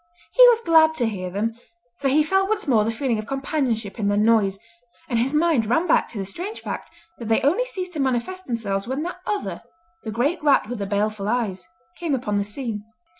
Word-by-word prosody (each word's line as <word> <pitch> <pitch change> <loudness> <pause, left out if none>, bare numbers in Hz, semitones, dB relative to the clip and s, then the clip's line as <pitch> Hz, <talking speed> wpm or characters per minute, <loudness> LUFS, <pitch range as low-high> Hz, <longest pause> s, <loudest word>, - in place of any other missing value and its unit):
He - - +4
was 470 -1 +5
glad 320 -1 +5
to 245 - +1
hear 185 -4 -4
them, 225 +5 -3 0.4
for 280 - 0
he 295 +3 +4
felt 385 +5 +1
once 430 -4 -1
more 225 -6 +4
the 220 - -1
feeling 230 0 -1
of 215 - -6
companionship 265 -7 -2
in 205 - 0
their 205 0 +2
noise, 210 -3 +3 0.5
and 235 -3 0
his 250 +3 +2
mind 305 -7 +2
ran 320 +10 +2
back 340 - +2
to 230 - -9
the 195 - -3
strange 360 - -6
fact - - -6 0.3
that 230 - -6
they 225 0 +3
only 355 - +2
ceased 370 -7 -6
to 310 - -5
manifest 275 +9 -1
themselves 205 -5 -2
when 265 +4 -2
that 355 +2 -5
other—the 335 - -6
great 285 +10 0
rat 285 -7 +4
with 240 -1 -5
the 200 - -3
baleful 205 0 -1
eyes—came 185 - -3
upon 210 -5 -1
the - - 0
scene. 210 0 -4
245 Hz, 210 wpm, -23 LUFS, 210-320 Hz, 0.5 s, was